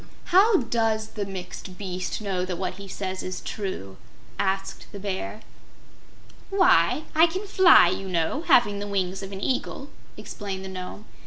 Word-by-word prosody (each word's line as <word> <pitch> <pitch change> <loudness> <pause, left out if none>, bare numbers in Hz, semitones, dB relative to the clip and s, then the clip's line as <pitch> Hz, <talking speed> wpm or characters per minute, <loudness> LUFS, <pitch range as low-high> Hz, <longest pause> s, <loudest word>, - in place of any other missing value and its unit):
"How 390 -1 +6
does 225 -2 0
the 205 -2 -4
Mixed 185 -1 -8
Beast 185 0 -4
know 190 -3 -1
that 185 -1 -3
what 185 +1 -4
he 200 - -8
says 190 -1 -4
is 185 0 -4
true?" 185 - -5 0.4
asked 195 0 -2
the 200 - -8
Bear. 200 +2 -4 1.1
"Why, 370 -5 +4
I 320 +2 +6
can 375 +5 -4
fly, 375 - +7
you 190 +1 -3
know, 170 - 0
having 205 -4 +5
the 205 - -4
wings 190 -1 -1
of 195 0 -7
an 195 0 -6
Eagle," 270 +3 -2 0.3
explained 190 -2 -6
the - - -6
Nome. 185 +3 -7
195 Hz, 160 wpm, -25 LUFS, 185-230 Hz, 1.1 s, fly